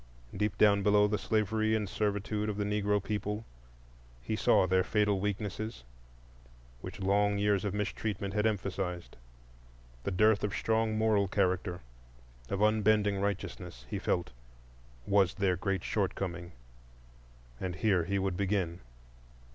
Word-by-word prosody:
Deep 105 -1 -1
down 100 -1 +5
below 105 +1 +4
the 105 0 -1
slavery 110 0 +1
and 105 -2 -1
servitude 105 +1 -1
of 105 - -3
the 105 - 0
Negro 105 -1 0
people 105 +1 -3 0.7
he - - -3
saw - - +4
their 95 0 +2
fatal 105 0 +1
weaknesses, 105 - -3 1.0
which - - -8
long 100 +1 +2
years 100 0 +2
of 100 -1 -2
mistreatment 105 -1 -3
had 105 +1 +2
emphasized. 95 -4 -3 0.9
The - - -1
dearth 105 +2 +3
of 105 -1 -1
strong 110 -1 +1
moral 110 -2 +2
character, 95 -2 0 0.7
of 100 +1 0
unbending 105 -2 +3
righteousness, 95 -10 -4
he - - -2
felt, 85 -6 -1 0.7
was 100 -3 +3
their 95 -2 +1
great 95 0 -2
shortcoming, 90 -4 -2 1.1
and 90 -1 -3
here 95 -5 +2
he 100 +3 -1
would 95 -1 -1
begin. 95 -3 -1
100 Hz, 130 wpm, -31 LUFS, 95-105 Hz, 1.1 s, down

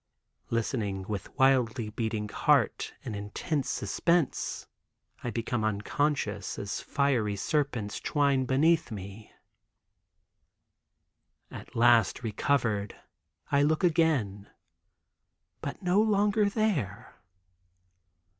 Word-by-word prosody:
Listening 110 -4 -1
with 100 -1 -5
wildly 125 -5 +2
beating 110 -1 -2
heart - - +1
in 120 - -5
intense 105 +8 -3
suspense, 155 - 0 0.6
I 120 - -2
become 115 -1 -2
unconscious 105 -1 -1
as 100 0 -4
fiery 125 -8 0
serpents 120 -3 -1
twine 140 -3 +1
beneath 150 +2 +3
me. 100 0 -8 2.2
At - - -10
last 120 -1 +4
recovered 110 -3 0 0.6
I 140 - +4
look 155 +5 +2
again; 145 - +1 1.1
but 140 - -6
no 180 +3 +3
longer 210 -1 +2
there. 185 - -1
120 Hz, 90 wpm, -29 LUFS, 105-150 Hz, 2.2 s, last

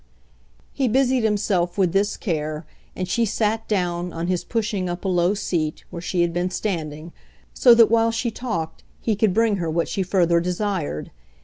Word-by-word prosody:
He 270 -2 0
busied 255 +1 +2
himself 200 -5 0
with 185 -3 +2
this 200 +1 +1
care, 155 -4 -3 0.3
and 185 - -3
she 235 +5 +1
sat 220 +1 0
down, 180 -3 -1
on 165 +1 -4
his 180 -1 -1
pushing 210 -5 -2
up 175 +2 -5
a - - +1
low 180 +1 +2
seat, 160 -6 -2
where 170 -2 -6
she 175 0 0
had 170 -1 -1
been 175 +1 0
standing; 165 -4 -4 0.4
so 245 -2 +6
that, 230 -2 +6
while 230 0 +4
she 230 +1 -1
talked, 195 -10 -4 0.2
he 220 - 0
could 210 0 +2
bring 220 +1 +2
her 170 -3 -2
what 165 +1 0
she 195 - -2
further 175 -2 +2
desired. 180 - -2
185 Hz, 185 wpm, -23 LUFS, 170-220 Hz, 0.4 s, so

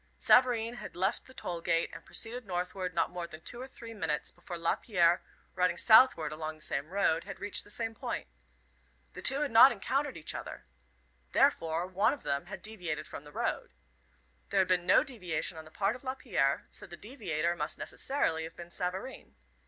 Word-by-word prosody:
Savareen 245 -2 +4
had - - -8
left 190 +5 -1
the 260 - -13
toll 170 -1 -5
gate 165 0 +1
and - - -9
proceeded 245 +3 -4
northward 180 -1 -3
not - - +1
more 175 -1 -5
than 155 -2 -10
two 240 +8 -7
or 260 - -6
three 230 -3 -10
minutes 160 -8 -2
before 175 - -8
Lapierre, 175 0 +2 0.3
riding 180 -1 +1
southward 220 -7 +6
along 155 0 -5
the 155 - -11
same 140 +3 -2
road, 180 -4 +1
had 195 - -8
reached 205 +1 +1
the - - -16
same 225 +1 -3
point. 220 - -4 0.9
The - - -8
two 270 +2 +3
had 295 - 0
not 230 +4 +9
encountered 265 +6 -1
each 155 - -4
other. - - -7 0.7
Therefore, 165 +1 +3
one 190 +7 +2
of 290 - -9
them 140 +3 -1
had 195 - -8
deviated 180 -8 -3
from 145 - -9
the 145 - -12
road. - - -3 0.7
There - - +2
had 185 - +1
been 180 -1 +1
no - - +6
deviation 180 - -2
on 160 - -10
the - - -13
part 195 +6 0
of 255 - -12
Lapierre, 245 - 0
so - - -4
the 175 -1 -10
deviator 175 - -2
must - - -2
necessarily 215 - 0
have 165 - -10
been 175 0 -9
Savareen. 185 +9 -4
185 Hz, 190 wpm, -31 LUFS, 165-230 Hz, 0.9 s, not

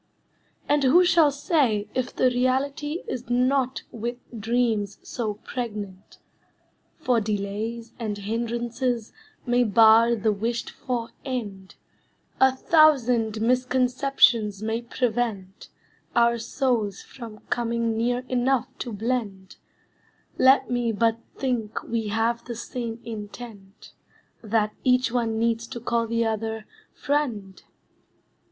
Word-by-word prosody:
And 290 0 +2
who 335 +8 +6
shall 330 -3 +5
say 280 - +1
if 255 -1 -1
the 255 - +2
reality 280 - 0
Is 245 - -5
not 255 +1 +1
with 235 +2 -4 0.2
dreams 220 -2 0
so 220 -4 -3
pregnant. 210 -5 -6 0.8
For 245 -3 +1
delays 215 +3 -3
And 215 -3 -3
hindrances 235 +2 -2 0.3
may 245 0 +3
bar 225 +2 +6
the 215 0 +1
wished 230 +3 -2
for 240 -3 -4
end; 205 -8 -5 0.6
A 265 0 +6
thousand 250 -7 +3
misconceptions 250 -3 +2
may 225 +1 -1
prevent 225 -5 -2 0.5
Our 235 0 +4
souls 225 -4 -1
from 230 -5 -10
coming 235 -1 0
near 245 +2 0
enough 255 +1 0
to 240 - -4
blend; 210 -3 -3 0.8
Let 265 +1 +5
me 240 -1 +1
but 225 +1 +1 0.2
think 240 -5 -2
we 225 -2 -2
have 225 +3 0
the 240 - -5
same 235 0 -5
intent, 210 -2 -9 0.5
That 215 -1 0
each 255 -2 +3
one 230 -2 0
needs 230 0 0
to 235 - -6
call 235 0 0
the 230 0 0
other, 220 0 -2 0.3
"friend!" 240 -10 -2
235 Hz, 115 wpm, -25 LUFS, 220-250 Hz, 0.8 s, who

